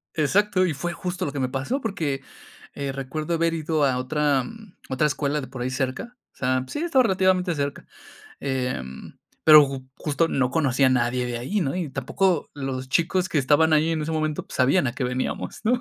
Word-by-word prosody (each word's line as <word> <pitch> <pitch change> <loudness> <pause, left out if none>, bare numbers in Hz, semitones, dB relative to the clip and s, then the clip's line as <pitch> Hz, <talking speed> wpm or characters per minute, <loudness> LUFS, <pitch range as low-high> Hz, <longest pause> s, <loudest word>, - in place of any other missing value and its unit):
Exacto, 185 +5 +2
y 160 - -1
fue 175 +5 -3
justo 180 0 -4
lo 145 - -3
que 140 - -3
me 130 -1 0
pasó, 140 - -2
porque, 160 -11 -2 0.5
eh, 140 -1 -3
recuerdo 145 +5 -4
haber 165 0 +1
ido 155 -2 0
a 130 -2 +2
otra, 140 0 +1
mm, 220 - -12
otra 130 +3 +2
escuela 145 0 -1
de 130 - -7
por 130 -1 -8
ahí 130 - -1
cerca. 135 - -3 0.2
O - - -42
sea, 130 0 0
sí, 295 - -5
estaba 295 -6 +3
relativamente 185 -3 +2
cerca. 140 0 -3 0.5
Em, 125 - -4 0.3
pero 155 -2 +9
ju 135 -1 -7
justo 165 +2 0
no 130 -2 +1
conocía 135 -3 +2
a - - +4
nadie 125 0 +1
de 120 -1 -3
ahí, 195 - -1
¿no? 145 +1 -1
Y 165 -6 -3
tampoco 155 +6 0
los 130 -2 -4
chicos 180 +5 +1
que 165 - -3
estaban 150 +4 +3
ahí 155 +2 +3
en 160 - -1
ese 160 +1 -3
momento, 155 -1 -2
pues, - - -8
sabían 135 +4 +3
a 120 - -1
qué 130 - -2
veníamos, 125 +1 -3
¿no? 245 +3 +3
145 Hz, 210 wpm, -24 LUFS, 130-170 Hz, 0.5 s, pero